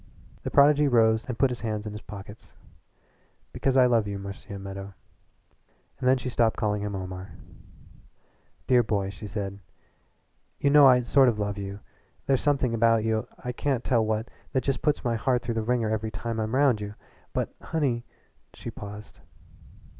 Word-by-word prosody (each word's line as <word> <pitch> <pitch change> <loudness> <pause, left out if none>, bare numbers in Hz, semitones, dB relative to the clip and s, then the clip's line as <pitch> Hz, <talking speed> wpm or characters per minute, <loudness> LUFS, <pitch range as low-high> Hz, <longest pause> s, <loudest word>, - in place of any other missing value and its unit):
The - - -4
prodigy 145 +1 +5
rose 110 -3 +3
and 125 -3 -4
put 135 -2 +3
his 120 - -5
hands 110 -2 -3
in 105 - -4
his 105 0 -7
pockets. 100 +1 -11 1.0
"Because 135 -1 +1
I 130 - +7
love 115 -4 +3
you, 100 -1 -3
Marcia 100 +1 -8
Meadow." 95 0 -8 1.0
And 130 - +2
then 130 - +5
she 125 - -6
stopped 115 -2 +1
calling 105 -2 0
him 105 -1 -3
Omar. 95 0 -6 1.3
"Dear 125 -2 +5
boy," 100 -3 -1
she 105 +2 -9
said, 100 0 -4 1.0
"you 140 - +2
know 145 -1 +8
I 125 -1 +6
sort 130 +2 +5
of 115 - -1
love 105 -1 -2
you. 100 +1 -6 0.4
There's 135 -2 +2
something 135 -5 +1
about 115 -1 +3
you 110 -1 0 0.2
I 125 - -1
can't 125 0 -1
tell 115 -3 +2
what 110 +1 -1 0.3
that 130 - +1
just 135 -1 -1
puts 150 - +1
my 120 -1 0
heart 125 +1 +1
through 120 0 -2
the 115 - -1
wringer 115 -1 0
every 110 0 -1
time 115 +2 -4
I'm 110 +2 -1
round 135 -6 +3
you. 105 0 -6 0.4
But - - -2
honey 135 -8 -1 0.2
" - - -41
She - - -7
paused. 105 +1 -10
115 Hz, 180 wpm, -27 LUFS, 105-125 Hz, 1.3 s, know